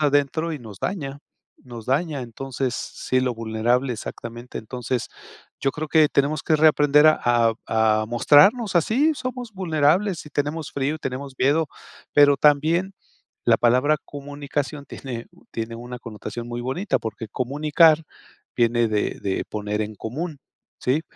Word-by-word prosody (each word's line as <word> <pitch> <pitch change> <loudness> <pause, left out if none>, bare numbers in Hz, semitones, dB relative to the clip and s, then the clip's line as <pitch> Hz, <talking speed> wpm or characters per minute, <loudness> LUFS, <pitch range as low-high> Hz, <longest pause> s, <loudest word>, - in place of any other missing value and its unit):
adentro 145 +3 +1
y 150 - -4
nos 110 -6 -11
daña, 140 -7 -3 0.4
nos 120 -4 -10
daña, 145 0 0
entonces, 130 +1 -4
sí, 130 0 -2
lo 125 -2 0
vulnerable 115 +3 0
exactamente. 120 +2 -8
Entonces, 125 +1 -3 0.5
yo 135 - +1
creo 155 +2 -5
que 155 -2 +5
tenemos 140 +1 +1
que 155 - +2
reaprender 150 -1 +5
a 155 - +5
a 120 -2 +3 0.5
a - - -4
mostrarnos 190 - +4
así, 255 - +3
somos 250 -4 -5
vulnerables 175 +1 +1
y 150 - -11
tenemos 145 +2 -3
frío, 140 +2 -1
y - - -15
tenemos 135 0 -5
miedo, 145 +4 +3 0.5
pero 145 -1 +6
también 160 +7 +3 0.5
la - - +5
palabra 130 +6 +3
comunicación 145 0 -5
tiene 120 -4 -7 0.3
tiene 115 0 -4
una 120 +1 -8
connotación 115 0 -7
muy 120 0 -4
bonita, 175 - -1
porque 110 -1 -6
comunicar 150 - +3 0.5
viene 120 -1 +3
de 105 -1 -1
de 95 -1 -2
poner 105 0 -3
en 105 0 -6
común, 145 - -5 0.4
¿sí? 140 +6 0
140 Hz, 145 wpm, -23 LUFS, 120-155 Hz, 0.5 s, pero